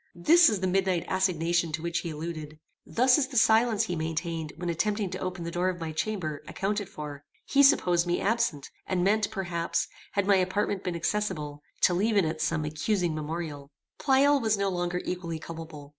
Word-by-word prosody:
This 330 - +6
is 205 -4 -1
the - - 0
midnight 185 -2 +1
assignation 170 -3 +1
to 160 +1 -3
which 170 0 -1
he 170 - -5
alluded. 155 -1 -6 0.3
Thus 250 +3 +4
is 275 - +1
the 265 -2 -4
silence 225 -1 +4
he 180 -5 -3
maintained 160 0 -3
when 175 +1 -5
attempting 205 +3 -1
to - - -4
open 185 -1 -4
the 170 - -4
door 180 +2 0
of 180 -1 -4
my 165 -1 -4
chamber, 160 -3 -3
accounted 205 0 -2
for. 150 -6 -8 0.2
He 280 - +3
supposed 180 - +4
me 175 - +1
absent, 205 -9 0 0.2
and 180 -2 0
meant, 205 +2 +2
perhaps, 175 -5 -2 0.3
had 200 -1 +1
my 200 -1 +5
apartment 190 +1 0
been 180 -2 -2
accessible, 165 -6 -2 0.2
to 180 - +5
leave 210 +4 +1
in 195 - +4
it 155 0 -3
some 155 0 0
accusing 170 +3 -1
memorial. 155 -2 -5 0.3
Pleyel 280 +1 +4
was 220 -2 +2
no 200 0 0
longer 175 -1 -2
equally 170 -3 -3
culpable. 160 -3 -9
180 Hz, 190 wpm, -28 LUFS, 160-205 Hz, 0.3 s, This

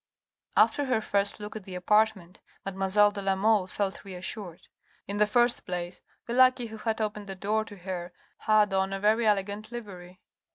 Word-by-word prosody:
After 290 - +4
her 255 -4 +1
first 200 -1 -1
look 210 +1 -7
at 215 - -6
the 185 -1 -8
apartment, 195 -1 +1 0.3
mademoiselle 195 +2 +3
de 205 -1 -6
la 195 0 +1
Mole 205 -1 +2
felt 195 0 -3
reassured. 185 -1 -7 0.4
In 200 - -3
the 210 0 +4
first 240 +2 +2
place, 175 0 -5 0.2
the 235 - -4
lackey 255 0 +5
who 220 -1 -8
had 220 +1 -2
opened 210 -1 -3
the 195 - -6
door 210 +3 0
to 205 -2 -11
her 180 -1 -5 0.3
had 210 -2 +3
on 190 0 +1
a 195 - -3
very 215 +3 +3
elegant 205 +1 0
livery. 185 -6 -9
205 Hz, 180 wpm, -28 LUFS, 190-220 Hz, 0.4 s, lackey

